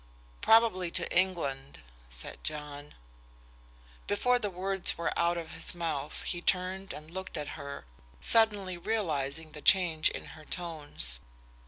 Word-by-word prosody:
"Probably 220 -6 +4
to 175 +1 -2
England," 150 -7 0 0.3
said - - -8
John. 150 -1 -6 1.1
Before 245 +5 +2
the 210 -3 -1
words 190 +1 0
were 170 - -1
out 170 0 +2
of 165 -1 -6
his - - +1
mouth 155 -4 -3
he 175 - -2
turned 190 +2 0
and 155 +2 -9
looked 190 -1 -6
at 145 -1 -4
her, 140 0 -7 0.3
suddenly 205 - +3
realizing 160 -7 -2
the 150 - -9
change 165 -4 +5
in - - -7
her 155 - -13
tones. 150 - 0
170 Hz, 135 wpm, -30 LUFS, 150-190 Hz, 1.1 s, change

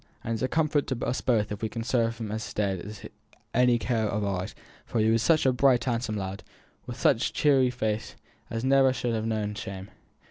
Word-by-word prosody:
And 115 - -2
it's 110 - -3
a 130 - +2
comfort 155 -1 +1
to 130 -3 -2
us 125 - -1
both 110 -5 +1
if 105 - -5
we 110 - -1
can 115 0 -5
serve 115 -2 0
him 110 -2 -5
as 110 +1 -3
is - - -9
dead 100 0 -2
by - - -8 0.5
any 125 -1 +5
care 115 -2 0
of 105 0 -1
ours, 95 -2 -3 0.3
for - - -4
he 110 +1 +3
were 115 - +3
such 155 +7 +3
a 130 - +4
bright 125 -1 +4
handsome 115 -3 -1
lad, 95 0 -4 0.5
with - - -6
such - - +3
a - - -18
cheery 135 -4 +4
face, 110 -3 -3 0.3
as 115 +1 -3
never 135 -1 +5
should 120 -1 -2
ha' 110 -1 -1
known 105 -2 -1
shame." 95 -1 -7
115 Hz, 225 wpm, -27 LUFS, 105-125 Hz, 0.5 s, any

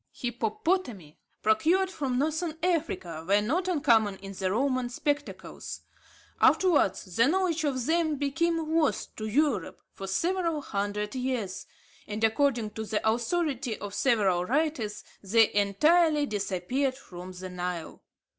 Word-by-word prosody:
Hippopotami 240 - -2 0.2
procured 340 - +3
from 270 -7 -2
Northern 315 +3 -1
Africa 240 - -1
were 200 +1 +4
not 315 - 0
uncommon 230 - +3
in 195 0 -9
the 190 -1 -2
Roman 255 +3 0
spectacles. 290 +3 -4 0.6
Afterwards, 340 - +4
the 230 +2 +5
knowledge 345 -1 +1
of 260 -4 -1
them 320 -1 +1
became 320 +3 0
lost 320 -3 0
to 215 - -4
Europe 245 - 0
for 195 - -7
several 335 - 0
hundred 205 0 -2
years; 250 -7 -3 0.4
and, 210 +1 -4
according 230 -1 +2
to 220 - -5
the 220 0 -2
authority 245 0 0
of 205 -1 -7
several 200 -9 +2
writers, 250 - -1 0.2
they 220 +3 +3
entirely 300 - +3
disappeared 215 +5 -1
from 180 -7 -10
the 185 +1 -7
Nile. 180 -2 -5
245 Hz, 125 wpm, -28 LUFS, 205-310 Hz, 0.6 s, the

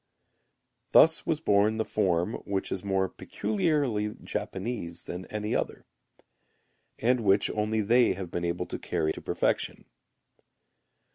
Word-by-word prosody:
Thus 160 0 +6
was 160 -1 0
born 105 -3 +3
the 110 - 0
form 95 0 +1
which 100 -1 -2
is 95 - -3
more 95 -1 +1
peculiarly 140 - -1
Japanese 95 -4 -4
than 90 +1 -6
any 105 0 -3
other, - - -2 1.1
and 125 +2 +2
which 100 -2 +3
only 110 +1 0
they 120 +4 +4
have 90 -2 -7
been 85 - -3
able 85 +1 -1
to - - -5
carry 80 -1 -1
to - - -8
perfection. - - -1
105 Hz, 130 wpm, -28 LUFS, 95-115 Hz, 1.1 s, Thus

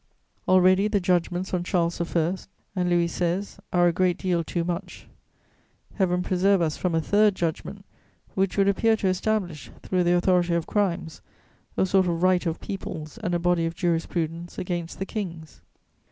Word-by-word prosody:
Already 185 +2 +5
the 210 -1 +1
judgments 180 0 0
on 180 -1 0
Charles 170 -1 0
I. 170 +1 0 0.4
and 180 -1 0
Louis 175 -1 +3
XVI. 175 +3 -2
are 175 -1 +4
a 170 - +2
great 180 0 +1
deal 175 -3 0
too 170 +1 -2
much: 175 +1 -5 0.9
Heaven 180 -2 +1
preserve 190 +2 +2
us 160 -3 0
from 180 -3 -1
a 165 - +2
third 205 +3 +3
judgment 165 -3 -4 0.5
which 195 -1 0
would 195 0 +4
appear 220 +3 +3
to 195 - -1
establish, 185 -4 -1
through 185 -1 +1
the 175 +1 +4
authority 175 -1 +2
of 170 -1 -1
crimes, 175 -7 -1 0.6
a - - +3
sort 190 -1 +3
of 170 0 -1
right 185 -1 +3
of 165 - -2
peoples 155 -6 -6
and 175 -1 -1
a - - +3
body 170 -1 +1
of 165 - -5
jurisprudence 170 -1 -2
against 175 -2 -4
the 195 - -3
kings! 170 -7 -6
180 Hz, 170 wpm, -25 LUFS, 170-190 Hz, 0.9 s, Already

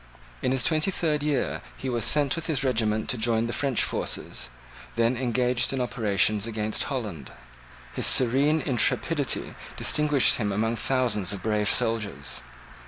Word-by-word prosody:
In 130 - 0
his 130 -2 0
twenty 155 +2 +2
third 155 -5 -1
year 145 -4 -1 0.2
he 135 - -6
was 120 -3 -1
sent 145 -2 +3
with 165 -1 -4
his 150 -4 0
regiment 110 -4 0
to 125 - -2
join 115 0 +1
the 115 - -4
French 135 -4 0
forces, - - -3 0.5
then 115 +2 +1
engaged 125 0 0
in 135 - -2
operations 110 -3 0
against 110 -1 -2
Holland. 105 - -5 0.6
His - - +1
serene 140 +5 +4
intrepidity 140 +3 0 0.2
distinguished 150 -3 +3
him 105 -3 -1
among 110 +3 -1
thousands 120 -8 0
of 95 -2 -8
brave 105 -1 0
soldiers. 110 -2 -1
120 Hz, 150 wpm, -25 LUFS, 110-135 Hz, 0.6 s, serene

